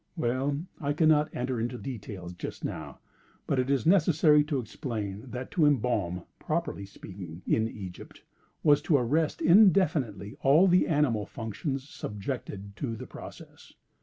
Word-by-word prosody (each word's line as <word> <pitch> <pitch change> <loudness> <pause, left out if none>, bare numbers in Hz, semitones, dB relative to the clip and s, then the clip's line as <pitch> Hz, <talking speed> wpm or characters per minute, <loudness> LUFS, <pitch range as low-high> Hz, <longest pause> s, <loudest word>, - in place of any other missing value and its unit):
Well 135 +1 0 0.2
I 145 -1 -1
cannot 155 -1 +4
enter 125 -1 -2
into 120 +2 -2
details 100 -9 -7
just 85 - -6
now: - - -6 0.5
but 135 - 0
it 130 +1 0
is 140 +1 +1
necessary 160 -4 +5
to 150 -2 -1
explain 110 -2 -5
that 125 +2 -6
to 155 -4 +3
embalm 105 -10 0 0.2
(properly 155 - -2
speaking), 90 -3 -10
in 110 0 +2
Egypt, 95 -6 -9 0.4
was 145 -2 +5
to 150 -1 +3
arrest 150 +6 0
indefinitely 160 - +4
all 150 +8 +6
the 180 0 +4
animal 145 - +1
functions 130 +5 -4
subjected 100 -4 -6
to 115 -5 -3
the 130 +3 -8
process. - - -12
130 Hz, 140 wpm, -28 LUFS, 105-150 Hz, 0.5 s, all